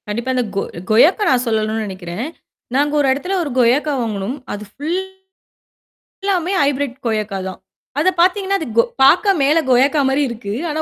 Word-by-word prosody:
கண்டிப்பா. 235 +5 -2
அந்த 250 - +1
கொ 195 - +1 0.3
கொய்யாக்காய் 320 - +5
நான் 250 -2 +2
சொல்லணுன'னு 220 0 0
நினைக்கிறேன். 185 +3 -6 0.5
நாங்க 290 +2 +2
ஒரு 285 - +2
இடத்துல 360 +8 -4
ஒரு 300 - -4
கொயக்கா 265 +5 +3
வாங்குனோம். 220 +2 -3 0.2
அது 205 0 -6
ஃபுல் 320 +6 -2 1.2
எல்லாமே 375 -3 0
ஹைபிரெட் 280 -2 0
கொயக்கா 215 -3 -1
தான். 185 - -7 0.4
அதப் 360 +3 +1
பார்த்தீங்கன்னா 390 +2 +2
அது 315 - -5
கொ 230 - +7 0.2
பார்க்க 365 +9 +5
மேல 290 +4 +3
கொயக்கா 275 +4 +4
மாரி 270 +2 +1
இருக்கு. 225 -4 -6 0.2
ஆனா 310 +1 -2
270 Hz, 160 wpm, -18 LUFS, 220-310 Hz, 1.2 s, கொ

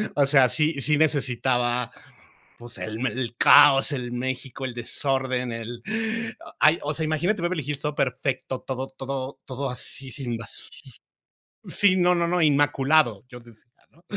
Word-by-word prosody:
O 145 - +4
sea, 135 -2 +5
sí 150 +3 0
sí 150 +3 +1
necesitaba, 125 -5 0 0.7
pues, 120 -1 -7
el 110 +4 -3
el 120 -2 -3
caos, 145 0 +7
el 125 -3 -4
México, 130 +1 -4
el 125 - -6
desorden, 130 +1 -2
el 115 +1 -6 0.8
ay 155 +2 +5
o 145 - -1
sea, 160 - -2
imagínate 170 +6 0
Beverly 175 -4 -1
Hills 145 -1 -3
todo 150 -1 -2
perfecto, 130 -1 -2
todo 130 0 -4
todo 135 0 -6
todo 135 +1 -4
así, 130 +1 -7
sin 120 -4 -4
basura. 115 0 -9 1.0
Sí, 200 -2 +3
no 180 -1 +4
no 170 -1 +1
no, 180 +1 +1
inmaculado, 145 -5 +3
yo 125 -2 -11
decía, 115 -2 -17 0.3
¿no? 165 - -26
135 Hz, 150 wpm, -25 LUFS, 125-150 Hz, 1.0 s, caos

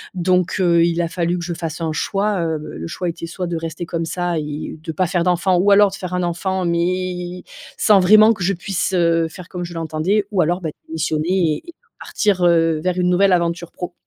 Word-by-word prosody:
Donc, 180 +1 +1
heu, 170 -2 +4
il 170 0 0
a 170 - 0
fallu 175 +1 -1
que 170 - -5
je 175 - -3
fasse 165 -1 -5
un 160 -2 -2
choix, 200 +2 -1
heu, 160 -1 -1 0.2
le 85 +1 -6
choix 180 - -4
était 165 0 -4
soit 180 +1 -5
de 170 - -3
rester 165 +1 -5
comme 165 0 -3
ça 175 0 -2
et 150 +1 -5
de 165 - -4
pas 185 +3 0
faire 175 0 0
d'enfant 180 +1 +2
ou 200 +3 +3
alors 205 0 +6
de - - -6
faire 180 -2 -6
un 180 0 0
enfant, 185 +2 -2
mais 180 +1 -2 0.3
sans 205 -3 +5
vraiment 215 +4 +7
que 190 - -6
je 190 - +2
puisse, 185 +1 -2
heu, 165 -2 +2
faire 180 +1 -11
comme 180 -1 -6
je 175 0 -7
l'entendais 165 +5 -1
ou 190 - +2
alors, 175 +3 +1
bah, 160 -3 -3 0.2
démissionner 160 +1 0
et - - -13
et - - -9 0.3
partir, 195 -4 0
heu, 165 -2 +3
vers 185 0 0
une 180 - +2
nouvelle 190 +2 +3
aventure 170 -1 0
pro. 180 -1 -7
175 Hz, 230 wpm, -20 LUFS, 165-185 Hz, 0.3 s, vraiment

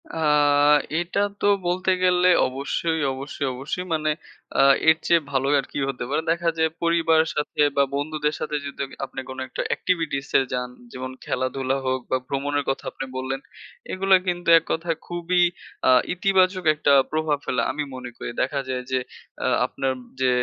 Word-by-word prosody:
আ 165 - -5 0.8
এটা 175 +3 -2 0.2
তো - - 0 0.2
বলতে 185 +2 0
গেলে 180 0 +4 0.2
অবশ্যই, 140 +5 -2
অবশ্যই, 140 +1 -5
অবশ্যই 140 +8 -4
মানে 155 -1 0 0.5
আ - - +7 0.3
এর 160 - +5
চেয়ে 170 -1 +5
ভালো 135 0 +1
আর - - -3
কি - - -6
হতে 125 -2 -4
পারে? 150 +3 0
দেখা 170 0 +1
যায় 160 0 +2
পরিবারের 165 -1 +3
সাথে, 150 - -3 0.2
বা 140 - +6
বন্ধুদের 150 +1 -1
সাথে 150 - -3
যদি 140 - -8
আমি 135 - -13
আপনি 135 - -8
কোন 130 - -7
একটা - - -4
এক্টিভিটিসে 155 -7 0
যান, 125 0 -2 0.2
যেমন 130 0 -6
খেলাধুলা 130 +1 -1
হোক, 130 0 0
বা 130 - +3
ভ্রমণের 145 +1 -1
কথা 135 - -2
আপনি - - -6
বললেন, 130 +1 -3 0.5
এগুলা 190 +1 +4
কিন্তু 175 -1 -1
এককথায় 165 0 -2
খুবই 175 +1 +1 0.4
আ - - +6 0.2
ইতিবাচক 185 0 +2
একটা 145 -1 +3 0.2
প্রভাব 155 -1 0
ফেলে। 125 - 0
আমি 150 - -3
মনে 125 -1 -7
করি। - - -5
দেখা 135 +2 0
যায় 125 -1 -2
যে 130 - +2 0.5
আ - - +2 0.2
আপনার 135 - -2 0.3
যে 130 - +4
150 Hz, 165 wpm, -24 LUFS, 135-170 Hz, 0.8 s, আ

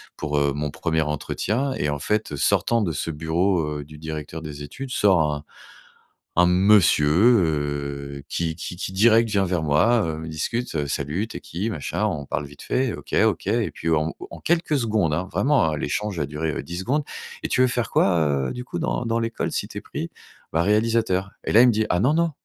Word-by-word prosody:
pour, 75 -1 -2
heu, 70 -1 +2
mon 75 0 -3
1er 80 0 0
entretien 110 - -1
et 75 - -1
en 75 -1 -2
fait, 105 +2 -1
heu, 70 - -4
sortant 115 +10 +2
de 85 -6 -1
ce 80 +3 -3
bureau, 80 0 0
heu, - - -5
du 75 +1 -13
directeur 80 0 -6
des 75 -2 -7
études, 130 - -7
sort 90 -10 +3
un 75 0 -5 0.9
un 90 +1 +5
monsieur, 90 -4 +5 0.4
heu, 70 -2 -3
qui 80 -2 -2
qui - - -6
qui 90 - -5
direct 115 +3 +4
vient 100 -2 +2
vers 90 -3 -1
moi, 85 +10 +3
heu, 80 -1 -2
on - - -7
discute, 115 +9 -3
heu: 75 -2 0
«Salut, 75 +11 -2
tu - - -6
es - - -7
qui? 95 +7 -4
Machin», 80 -10 -3
on 70 -1 -3
parle 70 - -3
vite 70 +1 -13
fait: 130 -2 0
«OK - - -5
OK» 110 -3 0
et 115 +1 +1
puis, 80 - -4
en 80 0 +2
au - - -9
au - - -8
en - - -9
quelques 165 -3 +1
secondes, 110 - +1
hein, 90 +5 -2
vraiment, 135 - +2
heu, - - -5
l'échange 95 +5 -2
a 75 - 0
duré, 75 +3 -3
heu, - - -3
10 85 +1 -6
secondes: 140 +9 0 0.4
«Et - - -2
tu 125 - +1
veux 130 - +5
faire 120 -3 -1
quoi, 75 -7 +2
heu, - - -4
du 125 0 -6
coup - - -5
dans 120 - -1
dans 115 0 0
l'école, 115 0 -2
si - - -2
tu - - -9
es - - -4
pris?» - - -5 0.4
«Bah, 80 - +3
réalisateur» 105 -2 +1
et - - -2
là, 115 - +7
il 125 - +7
me 120 - +4
dit: 110 +1 +1
«Ah 90 - +2
non, 130 +8 +3
non, 165 0 +2
85 Hz, 235 wpm, -23 LUFS, 75-110 Hz, 0.9 s, là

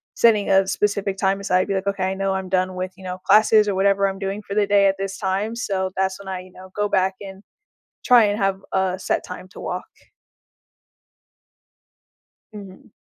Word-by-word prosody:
setting 215 -3 +3
a 195 0 +4
specific 200 0 -1
time 195 0 +1
aside. 185 -1 +1
Be 200 - -1
like, 190 +1 -3
"Okay. 195 -1 -1
I 190 - -1
know 195 0 -1
I'm 190 -1 -4
done 185 0 0
with," 185 0 -4
you 190 - -14
know, 180 0 -5
"classes 215 +1 +5
or - - 0
whatever 195 +1 +2
I'm 195 0 -5
doing 195 +1 -3
for 200 - -7
the 205 -1 +2
day 200 -1 +4
at 195 0 +1
this 195 0 -4
time." 200 +3 -2
So, 190 -5 -2
that's 190 0 -1
when 200 - -12
I, 185 -1 -4
you 185 0 -15
know, 185 +1 -13
go 205 0 0
back 190 -1 +1
and 195 0 -9 0.6
try 245 -3 +6
and 205 +1 0
have 195 -1 0
a 190 -1 0
set - - -1
time 180 0 -9
to - - -12
walk. - - -4 2.7
Mhm. 200 -1 -12
195 Hz, 200 wpm, -22 LUFS, 190-200 Hz, 2.7 s, try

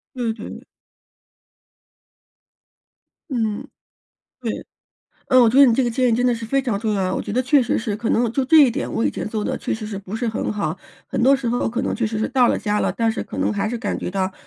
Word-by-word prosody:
对 240 -3 -1
对。 220 - -9 2.7
嗯。 230 -1 -2 0.8
对。 - - -4 0.6
嗯， 255 - +6
我 230 - +6
觉 250 - 0
得 280 - +10
你 245 - +5
这 255 +2 +2
个 - - +1
建 250 +1 +1
议 - - +2
真 245 +2 +2
的 245 - +3
是 230 0 -6
非 275 +5 +1
常 245 -6 -1
重 220 -2 -1
要 200 - 0
啊， 185 - -1
我 - - -2
觉 205 - -5
得 250 - +2
确 260 +1 +3
实 240 - 0
是 220 -3 -3
可 230 +1 -2
能， 240 - +2
呃， 225 - 0
就 265 +2 0
这 320 +5 +4
一 260 - +3
点， - - -4
我 225 - 0
以 - - +1
前 - - -4
做 215 -1 -3
得 - - -2
确 - - -3
实 215 -1 -4
是 210 -2 -5
不 200 +2 -6
是 240 - -2
很 220 - -2
好， 165 -7 -2 0.3
很 - - -2
多 270 +2 +5
时 255 -3 -3
候 240 -1 0
可 245 +2 -2
能 - - -1
确 240 - -1
实 215 0 -2
是 220 - 0
到 250 -3 +3
了 - - +1
家 210 -1 -1
了， - - +1
但 225 -1 0
是 - - -4
可 - - -8
能 - - +1
还 205 0 -1
是 240 - -3
感 225 -3 -2
觉 - - -4
到， 190 0 -1
230 Hz, 280 characters per minute, -21 LUFS, 215-250 Hz, 2.7 s, 得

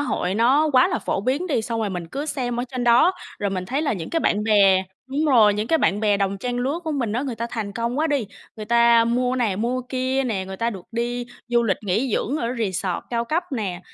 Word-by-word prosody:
hội 220 -8 -1
nó 270 +7 +3
quá 255 -1 +5
là 225 - -1
phổ 195 - -2
biến 275 - -1
đi, 270 -9 0
xong 230 0 -3
rồi 210 -2 -1
mình 175 -2 -5
cứ 280 - -5
xem 245 -5 -2
ở - - -2
trên 250 -2 -3
đó 245 +10 +5 0.3
rồi 200 -1 -1
mình 185 -1 -3
thấy 275 +7 -1
là 290 - 0
những 175 -6 -5
cái 330 - 0
bạn 210 - +1
bè 195 -3 +4 0.3
đúng 295 +3 0
rồi, 225 -8 +5
những 210 +1 -2
cái 325 +3 +2
bạn 205 -5 +1
bè 210 -2 +3
đồng 195 0 -1
trang 245 +3 -3
lứa 275 +7 -1
của 315 - -2
mình 240 -7 -1
á, 245 - -1
người 265 -4 -3
ta 230 +1 -4
thành 215 -4 -4
công 235 +5 -2
quá 320 - +2
đi, 280 -8 0 0.3
người 215 - -6
ta 235 0 +5
mua 250 +2 0
này, 220 -7 0
mua 245 +4 -1
kia 260 +1 0
nè, 200 -6 -2
người 190 0 -7
ta 230 +3 0
được 190 -4 -8
đi 240 +1 -2 0.2
du 240 0 +3
lịch 200 -5 +1
nghỉ 215 +5 0
dưỡng 275 - -1
ở 235 -6 -2
resort 190 -3 -2
cao 235 0 0
cấp 325 +8 0
nè. 195 -7 -3
235 Hz, 265 wpm, -23 LUFS, 205-260 Hz, 0.3 s, quá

